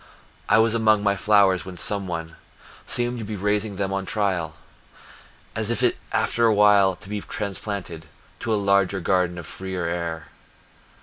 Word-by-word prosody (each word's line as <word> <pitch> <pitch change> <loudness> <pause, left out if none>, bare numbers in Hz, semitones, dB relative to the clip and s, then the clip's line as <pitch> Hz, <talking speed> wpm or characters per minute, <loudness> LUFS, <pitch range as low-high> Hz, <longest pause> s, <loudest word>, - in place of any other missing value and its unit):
I - - +5
was 110 0 +4
among 110 -2 +3
my 100 -1 +2
flowers 100 -3 +3
where 95 -1 -9
some 100 +1 -1
one 80 -1 -5 0.5
Seemed 120 0 -1
to - - -5
be 105 0 -5
raising 105 +1 -1
them 95 0 -2
on 95 -1 -3
trial, 95 -7 -1 1.0
As 110 0 0
if 120 +1 +2 0.2
after 115 -1 +2
while 100 -2 +5
to 90 - -13
be 105 0 -4
transplanted 100 -6 -5 0.3
To - - -3
a - - +3
larger 100 -1 +2
garden 90 0 0
of 85 - -7
freer 95 0 -5
air. 85 -1 -3
100 Hz, 160 wpm, -23 LUFS, 90-105 Hz, 1.0 s, I